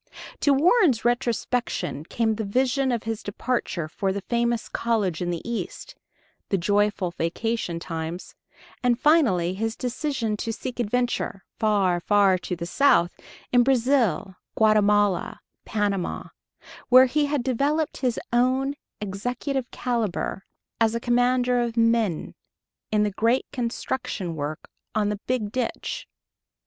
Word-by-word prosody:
To 285 Hz, -, +3 dB
Warren's 300 Hz, -, +4 dB
retrospection 240 Hz, -, -1 dB
came 225 Hz, +4 st, 0 dB
the 220 Hz, +1 st, -3 dB
vision 260 Hz, +5 st, +1 dB
of 235 Hz, -2 st, -1 dB
his 225 Hz, -1 st, -3 dB
departure 205 Hz, -6 st, -2 dB
for 190 Hz, +5 st, -2 dB
the 195 Hz, 0 st, -4 dB
famous 235 Hz, 0 st, 0 dB
college 210 Hz, -8 st, -1 dB
in 175 Hz, -, -1 dB
the 170 Hz, +3 st, -4 dB
East, 235 Hz, -1 st, -5 dB, 0.6 s
the 195 Hz, -, +2 dB
joyful 205 Hz, 0 st, +1 dB
vacation 175 Hz, +2 st, -2 dB
times, 165 Hz, +1 st, -5 dB, 0.5 s
and 245 Hz, -1 st, +2 dB
finally 230 Hz, -, +3 dB
his 225 Hz, +3 st, -2 dB
decision 250 Hz, -3 st, -2 dB
to 225 Hz, -, -3 dB
seek 245 Hz, +3 st, -6 dB
adventure 240 Hz, -3 st, -1 dB, 0.2 s
far, 200 Hz, -5 st, +2 dB
far 195 Hz, 0 st, +3 dB
to 180 Hz, 0 st, -4 dB
the 170 Hz, 0 st, -5 dB
south 175 Hz, -4 st, +3 dB, 0.4 s
in 245 Hz, -, +6 dB
Brazil, 245 Hz, -, +2 dB, 0.2 s
Guatemala, 205 Hz, -3 st, +3 dB, 0.3 s
Panama, 205 Hz, -4 st, -2 dB, 0.6 s
where 255 Hz, +1 st, +9 dB
he 290 Hz, +3 st, +1 dB
had 285 Hz, -3 st, -1 dB
developed 285 Hz, +5 st, 0 dB
his 250 Hz, -3 st, 0 dB
own 260 Hz, +3 st, +2 dB, 0.3 s
executive 245 Hz, +6 st, -3 dB
caliber 220 Hz, -5 st, -2 dB, 0.3 s
as 225 Hz, 0 st, +3 dB
a -, -, 0 dB
commander 245 Hz, +1 st, +2 dB
of 235 Hz, -1 st, -3 dB
men, 230 Hz, -6 st, +1 dB, 0.6 s
in 210 Hz, -1 st, +3 dB
the 210 Hz, -, 0 dB
great 230 Hz, +6 st, +1 dB
construction 240 Hz, -, -3 dB
work 150 Hz, +1 st, -5 dB, 0.3 s
on 210 Hz, -1 st, +2 dB
the 210 Hz, -1 st, -3 dB
Big 235 Hz, -5 st, -1 dB
Ditch.... 250 Hz, -1 st, -3 dB
230 Hz, 130 wpm, -25 LUFS, 200-250 Hz, 0.6 s, where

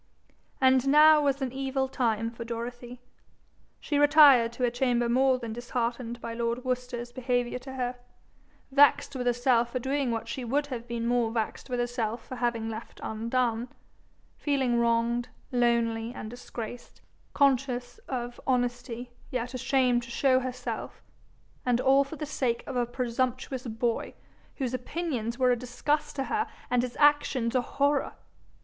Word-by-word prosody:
And 260 Hz, 0 st, +4 dB
now 305 Hz, +2 st, +7 dB
was 275 Hz, -1 st, +1 dB
an 255 Hz, -, -2 dB
evil 265 Hz, 0 st, -1 dB
time 230 Hz, -3 st, 0 dB
for 230 Hz, 0 st, -7 dB
Dorothy. 240 Hz, +1 st, -6 dB, 0.8 s
She 290 Hz, -, -1 dB
retired 290 Hz, -5 st, +7 dB
to 250 Hz, -, -4 dB
her 245 Hz, -, +3 dB
chamber 245 Hz, -1 st, +1 dB
more 260 Hz, +2 st, +3 dB
than 230 Hz, -3 st, -6 dB
disheartened 240 Hz, 0 st, -3 dB
by 230 Hz, -1 st, -5 dB
lord 235 Hz, +2 st, -2 dB
Worcester's 250 Hz, -1 st, -3 dB
behaviour 245 Hz, -1 st, -1 dB
to 265 Hz, +1 st, -9 dB
her, 250 Hz, -1 st, -3 dB, 0.7 s
vexed 285 Hz, 0 st, +4 dB
with 250 Hz, -1 st, -2 dB
herself 245 Hz, -1 st, +2 dB
for 255 Hz, -, -1 dB
doing 270 Hz, +1 st, -1 dB
what 225 Hz, -1 st, -2 dB
she 245 Hz, +2 st, -4 dB
would 280 Hz, +5 st, 0 dB
have 245 Hz, -4 st, -6 dB
been 235 Hz, -1 st, -3 dB
more 240 Hz, -1 st, +2 dB
vexed 225 Hz, +3 st, -3 dB
with 245 Hz, -1 st, -1 dB
herself 240 Hz, -2 st, -2 dB
for 255 Hz, -, -6 dB
having 235 Hz, -2 st, -1 dB
left 225 Hz, +1 st, -7 dB
undone, 230 Hz, +1 st, -1 dB, 0.7 s
feeling 265 Hz, -5 st, +1 dB
wronged, 235 Hz, +1 st, +1 dB, 0.2 s
lonely, 235 Hz, -2 st, +1 dB
and 215 Hz, -, -7 dB
disgraced, 245 Hz, -1 st, -8 dB, 0.3 s
conscious 250 Hz, -3 st, +1 dB
of 245 Hz, -2 st, -4 dB
honesty, 245 Hz, -1 st, -1 dB, 0.2 s
yet 250 Hz, 0 st, -3 dB
ashamed 255 Hz, -1 st, +2 dB
to 235 Hz, -, -10 dB
show 260 Hz, +2 st, +3 dB
herself 250 Hz, -1 st, -5 dB, 0.6 s
and 245 Hz, -1 st, +2 dB
all 270 Hz, +2 st, +5 dB
for 275 Hz, +3 st, -8 dB
the 305 Hz, -, -4 dB
sake 250 Hz, -5 st, -1 dB
of -, -, -6 dB
a 245 Hz, -1 st, +1 dB
presumptuous 255 Hz, +1 st, -2 dB
boy, 230 Hz, +1 st, -2 dB, 0.4 s
whose 260 Hz, -3 st, -3 dB
opinions 250 Hz, -3 st, -3 dB
were 255 Hz, -1 st, +3 dB
a -, -, +4 dB
disgust 270 Hz, +5 st, -2 dB
to 270 Hz, -, -1 dB
her 435 Hz, +8 st, -1 dB, 0.2 s
and 250 Hz, -1 st, +3 dB
his 250 Hz, -1 st, -5 dB
actions 290 Hz, -5 st, +3 dB
a 255 Hz, -, +3 dB
horror! 280 Hz, +2 st, 0 dB
245 Hz, 155 wpm, -28 LUFS, 235-265 Hz, 0.8 s, now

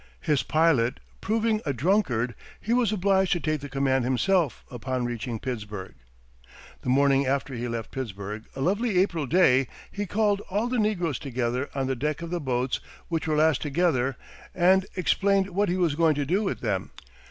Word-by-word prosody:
His 150 Hz, -3 st, +2 dB
pilot 155 Hz, -7 st, +2 dB, 0.2 s
proving 220 Hz, +1 st, +1 dB
a 140 Hz, -, -1 dB
drunkard, 125 Hz, -, +1 dB, 0.3 s
he 225 Hz, -, -1 dB
was 240 Hz, -4 st, +3 dB
obliged 190 Hz, -2 st, +2 dB
to 175 Hz, -, 0 dB
take 155 Hz, -2 st, -1 dB
the 145 Hz, -, -7 dB
command 135 Hz, -1 st, +1 dB
himself, 150 Hz, +5 st, +1 dB
upon 125 Hz, +1 st, -3 dB
reaching 120 Hz, 0 st, -3 dB
Pittsburg. 105 Hz, -, -5 dB, 0.9 s
The -, -, -4 dB
morning 135 Hz, +1 st, +3 dB
after 135 Hz, +1 st, -1 dB
he 120 Hz, 0 st, -3 dB
left 115 Hz, -2 st, -4 dB
Pittsburg, 105 Hz, -3 st, -5 dB
a 135 Hz, -, -5 dB
lovely 205 Hz, -, +1 dB
April 170 Hz, -6 st, +1 dB
day, 135 Hz, -6 st, +4 dB, 0.2 s
he 205 Hz, 0 st, -4 dB
called 205 Hz, 0 st, +1 dB
all 205 Hz, +5 st, 0 dB
the 250 Hz, -1 st, 0 dB
negroes 180 Hz, -, 0 dB
together 125 Hz, 0 st, -2 dB
on 135 Hz, -1 st, 0 dB
the 135 Hz, 0 st, -1 dB
deck 150 Hz, +5 st, -2 dB
of 170 Hz, -, -6 dB
the 175 Hz, -1 st, -2 dB
boats, 125 Hz, -1 st, -1 dB, 0.3 s
which 165 Hz, -2 st, -2 dB
were 155 Hz, -, +1 dB
lashed 155 Hz, -2 st, +3 dB
together, 140 Hz, -4 st, +1 dB, 0.4 s
and 185 Hz, +2 st, +4 dB
explained 195 Hz, +1 st, +2 dB
what 200 Hz, +2 st, +1 dB
he 180 Hz, -, 0 dB
was 175 Hz, -5 st, +2 dB
going 160 Hz, 0 st, +3 dB
to 145 Hz, 0 st, -1 dB
do 185 Hz, +8 st, +1 dB
with 200 Hz, -, -2 dB
them. 100 Hz, -5 st, -1 dB
150 Hz, 180 wpm, -26 LUFS, 125-190 Hz, 0.9 s, day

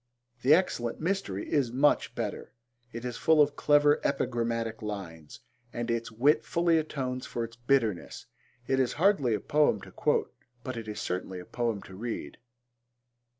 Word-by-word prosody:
The 140 Hz, +5 st, +7 dB
Excellent 120 Hz, -10 st, -1 dB
Mystery 160 Hz, -, -2 dB
is 135 Hz, -6 st, +1 dB
much 140 Hz, +4 st, +2 dB
better. -, -, -5 dB, 0.4 s
It 115 Hz, +1 st, -7 dB
is 120 Hz, -2 st, -4 dB
full 160 Hz, -1 st, +4 dB
of 145 Hz, -1 st, +4 dB
clever 145 Hz, 0 st, +4 dB
epigrammatic 115 Hz, -4 st, -1 dB
lines, 90 Hz, -8 st, -7 dB, 0.3 s
and 120 Hz, 0 st, -3 dB
its 115 Hz, 0 st, -2 dB
wit 135 Hz, +8 st, +3 dB
fully 170 Hz, -1 st, +2 dB
atones 130 Hz, -5 st, -4 dB
for 120 Hz, -, -3 dB
its 115 Hz, 0 st, -7 dB
bitterness. 120 Hz, -5 st, 0 dB, 0.4 s
It 135 Hz, +2 st, +1 dB
is 130 Hz, -2 st, +1 dB
hardly 150 Hz, -, +3 dB
a -, -, -2 dB
poem 145 Hz, -3 st, +2 dB
to -, -, -12 dB
quote -, -, 0 dB, 0.3 s
but 130 Hz, -, -4 dB
it 115 Hz, -2 st, -6 dB
is 105 Hz, -, -5 dB
certainly 90 Hz, +1 st, -3 dB
a 90 Hz, -, -10 dB
poem 115 Hz, -3 st, -2 dB
to 95 Hz, -, -12 dB
read. 115 Hz, +3 st, -5 dB
120 Hz, 160 wpm, -29 LUFS, 110-145 Hz, 0.4 s, The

